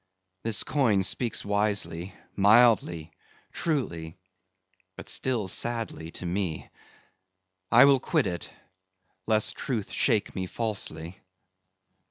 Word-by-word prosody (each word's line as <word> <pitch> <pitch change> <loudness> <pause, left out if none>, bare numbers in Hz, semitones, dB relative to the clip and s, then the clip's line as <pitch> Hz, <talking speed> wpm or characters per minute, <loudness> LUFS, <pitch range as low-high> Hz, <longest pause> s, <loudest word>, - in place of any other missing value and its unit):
This 110 -3 +3
coin 115 -9 +2
speaks 115 +5 -1
wisely, 100 -3 -1 0.2
mildly, 100 -6 +4 0.4
truly, 85 - -2 0.8
but - - -9
still 120 -7 0
sadly 115 -5 -3
to - - -7
me. 90 -3 -3 1.0
I 120 +3 +8
will 140 -1 +5
quit 155 +2 0
it, 85 -1 -4 0.8
lest 110 -1 +2
Truth 115 -8 -3
shake 105 - +1
me 95 -1 -4
falsely." 95 -5 -4
105 Hz, 100 wpm, -27 LUFS, 90-120 Hz, 1.0 s, I